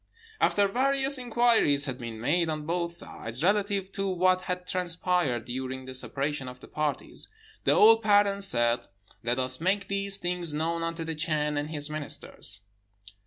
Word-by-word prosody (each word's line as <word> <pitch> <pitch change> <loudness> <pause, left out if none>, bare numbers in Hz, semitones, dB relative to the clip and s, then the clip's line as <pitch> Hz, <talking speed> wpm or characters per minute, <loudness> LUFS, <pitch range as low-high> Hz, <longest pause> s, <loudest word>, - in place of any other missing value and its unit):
"After 205 -1 +3
various 270 +4 +1
inquiries 235 - +3
had 130 -2 -4
been 115 -2 -6
made 165 +8 +1
on 155 -1 -3
both 170 +1 -1
sides, 125 -6 -4
relative 200 0 +1
to 195 0 -1
what 185 0 +3
had 180 0 -4
transpired 175 -9 0
during 130 +1 -5
the 130 - -7
separation 135 +1 -2
of 125 0 -9
the - - -13
parties, 150 -1 -3 0.4
the - - +5
old 225 +1 +7
parents 205 -2 +3
said, 120 -4 +2 0.3
'Let 120 +2 0
us 130 +2 0
make 195 +2 0
these 200 0 0
things 175 -4 -1
known 165 +2 -1
unto 165 0 -3
the 160 0 -3
Chan 150 -1 0
and 145 +1 -2
his 150 -2 -3
ministers.' 145 -9 -4
165 Hz, 165 wpm, -28 LUFS, 140-195 Hz, 0.4 s, old